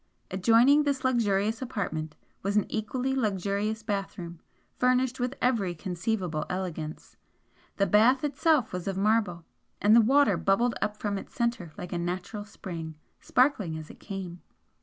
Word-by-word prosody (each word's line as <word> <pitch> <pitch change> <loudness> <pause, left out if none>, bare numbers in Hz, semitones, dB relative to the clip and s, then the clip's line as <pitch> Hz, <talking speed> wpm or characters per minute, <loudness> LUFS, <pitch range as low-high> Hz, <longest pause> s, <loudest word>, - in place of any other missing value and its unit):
Adjoining 230 +9 +5
this 285 -2 -1
luxurious 220 -3 +1
apartment 160 -10 -3 0.3
was 200 +2 0
an 210 - +3
equally 250 +4 -2
luxurious 210 -1 -1
bathroom, 195 -5 -4 0.4
furnished 255 0 +2
with 250 +2 -1
every 215 -8 +1
conceivable 175 -1 -2
elegance, 170 -4 -5 0.6
the 200 - +3
bath 235 +7 +4
itself 295 - +2
was 180 0 -4
of 195 -1 -2
marble, 200 -5 +1 0.3
and 210 +2 +5
the 235 - +8
water 235 -4 +4
bubbled 235 +7 +2
up 210 0 -1
from 205 -2 -2
its - - -13
centre 235 -9 -1
like 180 - -6
a 175 - -1
natural 180 +4 -4
spring, 170 -6 -7 0.2
sparkling 255 - +1
as 155 -1 -8
it - - -16
came. 185 -4 -7
205 Hz, 145 wpm, -28 LUFS, 180-240 Hz, 0.6 s, the